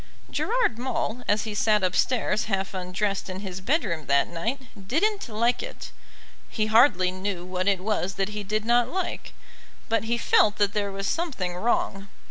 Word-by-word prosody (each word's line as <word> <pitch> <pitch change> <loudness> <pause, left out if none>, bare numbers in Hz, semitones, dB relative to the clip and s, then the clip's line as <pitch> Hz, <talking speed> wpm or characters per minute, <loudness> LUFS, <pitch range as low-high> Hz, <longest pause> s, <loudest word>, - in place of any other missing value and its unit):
Gerard 465 - +1
Maule, 250 -1 -2
as 205 0 +2
he 215 -1 -4
sat 210 -1 +2
upstairs 215 +4 +1
half 195 -2 -2
undressed 190 +2 -2
in 185 +1 -5
his 190 -2 -6
bedroom 190 - 0
that 140 0 +3
night 225 +11 -3 0.3
didn't 400 - 0
like 235 +3 +1
it. - - -8 0.6
He 215 - 0
hardly 215 -5 +5
knew 185 -1 -4
what 185 +1 -2
it 195 -2 +2
was 195 -2 -1
that 195 +1 -1
he 210 0 -5
did 215 +2 -2
not 240 0 +3
like, 375 -1 -3 0.6
but 225 0 +1
he 235 +1 0
felt 215 -2 +4
that 205 -1 +1
there 205 -1 -1
was 195 0 -4
something 245 - -2
wrong. 195 -1 0
210 Hz, 170 wpm, -26 LUFS, 190-235 Hz, 0.6 s, hardly